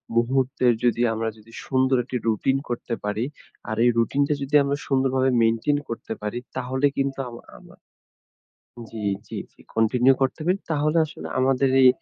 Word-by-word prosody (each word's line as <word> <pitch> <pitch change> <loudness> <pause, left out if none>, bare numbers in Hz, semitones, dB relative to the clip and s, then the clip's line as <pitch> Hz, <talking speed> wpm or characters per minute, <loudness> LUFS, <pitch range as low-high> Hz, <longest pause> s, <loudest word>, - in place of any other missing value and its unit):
মুহূর্তের 125 0 +2
যদি 120 0 +2
আমরা 110 0 -1
যদি 110 +1 -18
সুন্দর 130 0 +2
একটি 125 0 -3
রুটিন 135 +5 +2
করতে 120 0 -3
পারি। 105 +4 -1 0.4
আর 110 - -1
এই - - +6
রুটিনটা 140 +5 +2
যদি 145 +2 -1
আমরা 140 +1 -1
সুন্দরভাবে 130 -1 +2
মেইনটেইন 115 +6 +2
করতে 115 -1 -5
পারি 105 +3 -3 0.2
তাহলে 130 +2 -1
কিন্তু 135 0 -1
আমা 120 - -10 0.2
আমা - - -17 1.2
জি, 110 -2 -6 0.2
জি, - - -5
জি। - - -25
কন্টিনিউ 125 +4 +4
করতে 135 +4 0
পারি, 185 +2 +2
তাহলে 155 +1 +1
আসলে - - -9
আমাদের 135 0 +2
এই 130 - +9
130 Hz, 160 wpm, -24 LUFS, 115-135 Hz, 1.2 s, এই